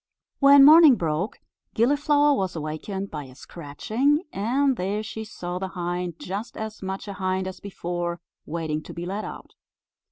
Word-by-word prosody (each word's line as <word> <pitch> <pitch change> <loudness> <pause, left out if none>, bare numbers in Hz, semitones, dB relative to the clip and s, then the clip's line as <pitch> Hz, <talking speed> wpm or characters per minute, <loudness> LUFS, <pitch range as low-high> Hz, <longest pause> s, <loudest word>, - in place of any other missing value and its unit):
When 275 0 +8
morning 310 -2 +9
broke, 170 - -2 0.4
Gilliflower 290 +4 +3
was 190 -9 -2
awakened 165 +6 -5
by 150 -2 -5
a 130 -1 -14
scratching, 220 - -1
and 260 +7 +1
there 205 +2 -2
she 220 +1 -6
saw 180 -4 -6
the 190 - -3
hind, 175 -1 -3
just 200 +7 -6
as 220 0 -6
much 190 +1 -5
a 200 - -5
hind 185 0 -2
as 190 -1 -7
before, 175 -3 -4 0.3
waiting 155 -1 -3
to - - -11
be 170 0 -5
let 200 +4 -4
out. - - -9
190 Hz, 160 wpm, -25 LUFS, 175-235 Hz, 0.4 s, morning